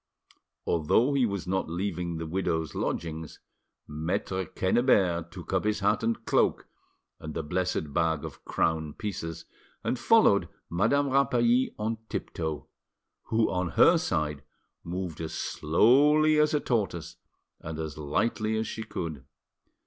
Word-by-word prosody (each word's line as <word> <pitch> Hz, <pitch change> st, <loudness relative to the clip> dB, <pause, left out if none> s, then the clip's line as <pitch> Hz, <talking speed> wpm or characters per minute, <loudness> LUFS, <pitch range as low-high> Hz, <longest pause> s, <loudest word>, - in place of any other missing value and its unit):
Although 100 Hz, -, +2 dB
he 130 Hz, -4 st, +3 dB
was 100 Hz, -3 st, -4 dB
not 95 Hz, -2 st, -1 dB
leaving 85 Hz, -1 st, -3 dB
the 80 Hz, -, -4 dB
widow's 80 Hz, -2 st, -1 dB
lodgings, 80 Hz, -1 st, -4 dB, 0.5 s
Maitre 85 Hz, +4 st, -2 dB
Quennebert 95 Hz, -4 st, +2 dB
took 90 Hz, +1 st, -8 dB
up 95 Hz, -, +2 dB
his 105 Hz, -1 st, 0 dB
hat 105 Hz, +2 st, +2 dB
and 115 Hz, 0 st, -1 dB
cloak -, -, +2 dB, 0.5 s
and 80 Hz, -1 st, -7 dB
the 80 Hz, -, -2 dB
blessed 90 Hz, -2 st, -2 dB
bag 80 Hz, -2 st, +1 dB
of -, -, -10 dB
crown 80 Hz, -2 st, 0 dB
pieces, 85 Hz, -5 st, -5 dB, 0.4 s
and 125 Hz, -, -1 dB
followed 220 Hz, -, +4 dB, 0.2 s
Madame 140 Hz, +11 st, +2 dB
Rapally 125 Hz, -2 st, +3 dB
on 110 Hz, +1 st, -2 dB
tiptoe, 80 Hz, -3 st, -4 dB, 0.6 s
who 110 Hz, 0 st, +1 dB
on 90 Hz, -1 st, -1 dB
her -, -, +7 dB
side 75 Hz, -2 st, -1 dB, 0.4 s
moved 85 Hz, -2 st, -5 dB
as 80 Hz, -, -5 dB
slowly 145 Hz, -, +4 dB
as 150 Hz, 0 st, +3 dB
a -, -, +3 dB
tortoise 100 Hz, -, -2 dB, 0.4 s
and 80 Hz, 0 st, -6 dB
as 80 Hz, -2 st, -4 dB
lightly 110 Hz, +9 st, -1 dB
as 110 Hz, -, -1 dB
she 110 Hz, -, -5 dB
could. 80 Hz, -, -5 dB
95 Hz, 135 wpm, -28 LUFS, 80-115 Hz, 0.6 s, her